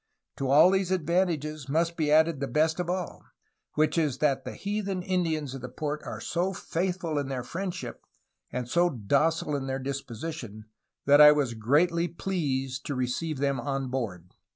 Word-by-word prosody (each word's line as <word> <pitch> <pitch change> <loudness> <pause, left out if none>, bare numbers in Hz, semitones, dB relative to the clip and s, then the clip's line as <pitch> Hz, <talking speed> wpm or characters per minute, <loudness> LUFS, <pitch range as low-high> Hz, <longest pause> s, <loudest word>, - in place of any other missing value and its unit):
To 135 - -2
all 155 +6 +7
these 190 -1 +1
advantages 160 -5 0
must 165 +3 +1
be 155 -3 0
added 160 -1 +4
the 140 - -2
best 155 +6 +1
of 175 -1 -2
all, 180 -1 -3 0.5
which 155 +2 +2
is 145 -5 0
that 135 -3 +1
the 130 - -6
heathen 200 -2 -3
Indians 160 -7 -1
of 135 - -7
the 125 - -6
port 150 +3 -4
are - - -5
so 180 +3 -1
faithful 175 -3 -2
in 140 - -3
their 130 -2 -3
freindship 185 +6 -5 0.5
and 125 -1 -3
so 175 +7 +3
docile 145 +5 +1
in 135 -1 -3
their 135 0 -1
dis 135 +1 -3
position 115 -4 -7 0.4
that 145 +1 +7
I 150 0 +11
was 145 -5 +1
greatly 160 +10 +2
pleased 140 -7 -2
to 145 - -2
receive 130 +5 -2
them 140 -1 0
on 135 0 -2
board." 100 -9 -4
150 Hz, 175 wpm, -28 LUFS, 135-170 Hz, 0.5 s, I